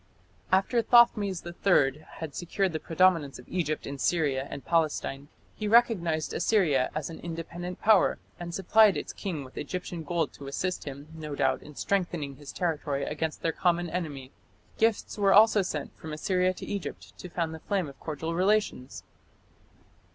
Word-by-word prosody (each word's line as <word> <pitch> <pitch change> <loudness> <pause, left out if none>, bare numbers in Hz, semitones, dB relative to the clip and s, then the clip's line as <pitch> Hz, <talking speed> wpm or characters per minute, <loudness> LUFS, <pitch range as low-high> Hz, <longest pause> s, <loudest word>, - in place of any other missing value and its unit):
After 195 +6 +3
Thothmes 215 -6 +4
III 155 -5 +2
had 160 -3 -6
secured 185 +1 -1
the 155 - -2
predominance 165 -5 +2
of - - -14
Egypt 155 -4 -2
in 140 0 -6
Syria 140 -2 +1
and 140 - -7
Palestine 155 -4 0 0.3
he 215 - -3
recognized 190 -9 +3
Assyria 155 -12 +2
as 155 +1 -3
an 160 - -9
independent 170 +2 -6
power, 210 -3 +4 0.2
and 175 0 -5
supplied 200 +3 +4
its - - -5
king 170 -8 -4
with 130 - -9
Egyptian 175 +2 -5
gold 165 -1 -1
to 140 - -10
assist 180 +6 -3
him, 140 +1 -7
no 155 -2 -6
doubt, 135 -1 +1
in 150 - -13
strengthening 170 -8 -1
his 145 0 -9
territory 150 -5 -2
against 155 +1 -3
their 165 - +2
common 175 0 0
enemy. 145 -7 -4 0.5
Gifts 220 -1 +1
were 195 -1 +4
also 215 0 +7
sent 155 -6 -4
from 160 -1 -7
Assyria 185 +3 +1
to - - -8
Egypt 200 -3 -6
to 180 - -8
fan 165 -2 -2
the 160 - -7
flame 190 -1 -1
of 140 - -12
cordial 160 +1 -4
relations. 190 -7 0
170 Hz, 165 wpm, -28 LUFS, 150-185 Hz, 0.5 s, also